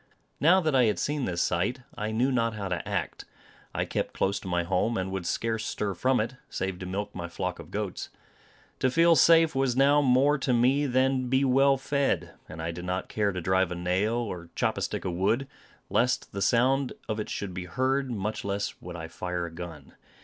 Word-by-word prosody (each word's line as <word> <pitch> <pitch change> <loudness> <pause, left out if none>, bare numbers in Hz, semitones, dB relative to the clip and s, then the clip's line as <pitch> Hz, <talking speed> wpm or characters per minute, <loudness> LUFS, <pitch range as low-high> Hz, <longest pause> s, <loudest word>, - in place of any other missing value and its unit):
Now 170 +7 +6
that 155 -3 0
I 130 -2 +5
had 105 - +1
seen 145 -2 -1
this 85 -2 0
sight, 90 +9 0
I 105 -2 -3
knew 120 +5 +1
not 115 -3 +1
how 100 -3 -4
to 90 - -3
act; - - -3 0.5
I - - -1
kept - - -3
close 100 +1 0
to - - -10
my 90 -1 0
home, 95 +6 0
and 95 0 -2
would 95 -3 -3
scarce 115 -1 -1
stir 105 -1 -2
from 130 +8 +1
it, 115 +4 -2
save 95 -1 -3
to 90 - -6
milk 100 +3 -4
my 85 -1 -5
flock 90 +1 -4
of - - -10
goats. - - -4 0.7
To 130 - +2
feel 165 +4 +5
safe 165 -1 +6
was 135 -2 +1
now 140 +2 +5
more 140 +2 +4
to 130 -1 0
me 130 +5 +3
than 130 +1 +2
to 125 - -4
be 130 +2 +2
well 135 +1 +4
fed; 140 +1 0 0.2
and 80 +1 -7
I 85 - -2
did 90 +1 -7
not 90 +1 -3
care 105 -2 0
to 90 -2 -4
drive 95 +1 +2
a - - -2
nail, 90 +6 0
or 90 -8 -4
chop - - 0
a - - -5
stick - - -3
of 90 - -1
wood, 105 +9 +1 0.4
lest 125 +1 +1
the 100 - -5
sound 130 +5 +2
of 110 0 -2
it 105 - -4
should 100 -3 -4
be 90 0 -5
heard, 130 +7 0
much 105 -2 -3
less 100 0 -2
would 90 0 -8
I 80 -1 -6
fire 90 +1 -4
a 85 - -7
gun. 85 -1 -9
110 Hz, 220 wpm, -28 LUFS, 90-130 Hz, 0.7 s, Now